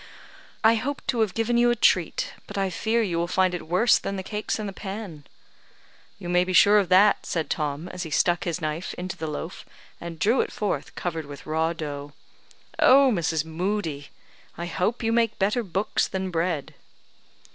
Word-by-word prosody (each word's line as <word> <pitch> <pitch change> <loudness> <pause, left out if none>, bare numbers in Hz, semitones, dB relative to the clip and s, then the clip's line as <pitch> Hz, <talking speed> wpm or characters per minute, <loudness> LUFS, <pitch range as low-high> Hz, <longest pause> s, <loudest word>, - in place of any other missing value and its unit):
"I 220 +1 +6
hoped 265 +5 -3
to 245 -3 +1
have 215 -4 +1
given 235 +1 +1
you 240 0 +5
a 240 - +3
treat, - - +1
but 205 - -7
I 195 -1 0
fear 225 +6 0
you 175 -5 -1
will 170 - 0
find 185 0 +2
it 175 - -5
worse 185 +8 +4
than 200 - -4
the 190 - -4
cakes 210 +2 -3
in 215 - -4
the 200 - -5
pan." 190 -7 -7 0.9
"You 190 -3 -8
may 180 0 +3
be 185 0 -3
sure 205 +3 +7
of 190 -4 -1
that," 195 +3 +5
said 165 -2 -2
Tom, 150 +1 -2
as 185 - -6
he 165 - -4
stuck 175 +3 +2
his 175 0 -2
knife 155 +2 -4
into 180 0 -5
the 160 -3 -5
loaf, 155 +3 -6 0.4
and 170 -1 -7
drew 225 +10 +3
it - - -4
forth 210 - -3
covered 165 -4 -4
with 145 -1 -10
raw 160 +1 0
dough. 145 -3 -6 0.7
"Oh, 270 0 +6
Mrs. 160 -4 0
Moodie! 160 -3 -3 0.5
I 170 - -4
hope 185 +7 -1
you 225 - +1
make 230 -1 +1
better 210 +5 +1
books 195 -1 -1
than 190 -1 -3
bread." 165 -3 -1
185 Hz, 195 wpm, -25 LUFS, 165-215 Hz, 0.9 s, sure